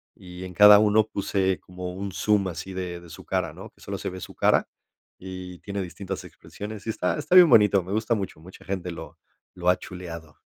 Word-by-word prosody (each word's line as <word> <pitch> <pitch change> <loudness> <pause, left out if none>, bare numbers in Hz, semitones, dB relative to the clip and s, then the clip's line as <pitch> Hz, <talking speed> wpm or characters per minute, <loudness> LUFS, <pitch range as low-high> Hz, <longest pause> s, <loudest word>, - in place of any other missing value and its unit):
y 90 0 -10
en 90 -1 -8
cada 105 +3 +9
uno 105 0 +3
puse 95 -2 -1
como 90 0 -7
un 100 +2 -5
zoom 100 +1 +1
así 95 +2 -6
de- 90 -2 -4
de 85 - -14
su 80 - -11
cara, - - -1
¿no? - - -10
Que - - -27
solo - - -5
se - - -4
ve 95 - -8
su - - -9
cara - - +3 0.5
y 90 -1 -8
tiene 100 -1 -5
distintas 95 +1 -6
expresiones. 105 0 -9
Y - - -1
está- 90 -4 -1
está 155 +4 0
bien 180 -2 +9
bonito, 105 -5 +5
me 95 +3 -6
gusta 110 +2 +1
mucho, 95 -6 -5
mucha 90 +4 -14
gente 95 -2 -4
lo 80 -1 -9 0.4
lo 90 -1 -5
ha 90 - +5
chuleado. 85 -4 -9
95 Hz, 215 wpm, -25 LUFS, 90-105 Hz, 0.5 s, cada